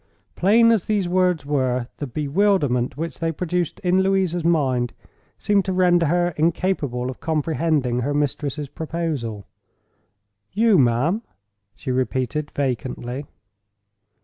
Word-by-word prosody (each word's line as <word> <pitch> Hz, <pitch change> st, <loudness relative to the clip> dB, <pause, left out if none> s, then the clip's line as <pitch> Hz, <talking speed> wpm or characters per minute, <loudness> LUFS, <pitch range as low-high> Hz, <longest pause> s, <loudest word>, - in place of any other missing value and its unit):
Plain 230 Hz, +5 st, +5 dB
as 220 Hz, -6 st, +1 dB
those 205 Hz, -4 st, +1 dB
words 180 Hz, -3 st, +1 dB
were, 130 Hz, -4 st, 0 dB
the 145 Hz, -, -4 dB
bewilderment 145 Hz, -, +1 dB
which 165 Hz, +1 st, -5 dB
they 165 Hz, -1 st, 0 dB
produced 175 Hz, +1 st, -2 dB
in 185 Hz, +1 st, +3 dB
Louisa's 190 Hz, -3 st, +1 dB
mind 130 Hz, -8 st, +1 dB, 0.4 s
seemed 205 Hz, -1 st, +2 dB
to 190 Hz, -, -1 dB
render 175 Hz, -2 st, +3 dB
her 175 Hz, +2 st, +2 dB
incapable 155 Hz, -6 st, 0 dB
of 130 Hz, -, -12 dB
comprehending 155 Hz, -5 st, 0 dB
her 130 Hz, +4 st, -1 dB
mistress's 145 Hz, 0 st, -2 dB
proposal. 150 Hz, -10 st, -4 dB, 1.1 s
"You, 215 Hz, -3 st, +4 dB
ma'am!" 135 Hz, -, +2 dB, 0.5 s
she 130 Hz, -, -5 dB
repeated, 130 Hz, +3 st, -1 dB
vacantly. 130 Hz, 0 st, -3 dB
155 Hz, 120 wpm, -22 LUFS, 130-180 Hz, 1.1 s, Plain